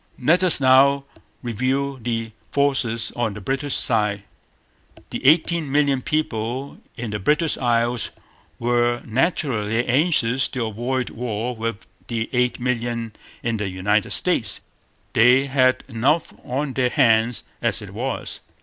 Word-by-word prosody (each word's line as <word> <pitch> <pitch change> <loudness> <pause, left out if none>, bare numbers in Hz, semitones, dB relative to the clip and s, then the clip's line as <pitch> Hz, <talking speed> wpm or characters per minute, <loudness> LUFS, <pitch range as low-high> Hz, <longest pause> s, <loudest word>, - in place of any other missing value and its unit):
Let 175 +4 +3
us 180 -5 +5
now 135 +1 +5 0.4
review 130 +4 -1
the 115 -1 -3 0.2
forces 130 -5 +1
on 115 -4 -1
the - - -6
British 135 +6 -1
side. 105 -3 +1 0.9
The - - -5
eighteen 155 +1 +3
million 140 -2 +2
people 130 -2 -3 0.2
in 115 -3 -4
the 105 - -3
British 150 - +2
Isles 120 -1 0 0.5
were 120 0 +1
naturally 120 - 0
anxious 130 -2 +2
to 125 -3 -3
avoid 120 +4 -2
war 120 +1 -3
with 115 -1 -4 0.2
the 115 -2 -3
eight 125 0 +1
millions 120 -2 -2 0.3
in 115 -1 -1
the 105 -2 -2
United 100 +2 0
States. - - +1 0.5
They 125 +4 +5
had 130 -2 +2
enough 135 +6 0
on 135 +2 -3
their 125 -1 +1
hands 115 -3 +3 0.2
as - - 0
it - - -10
was. - - -3
125 Hz, 130 wpm, -22 LUFS, 115-135 Hz, 0.9 s, us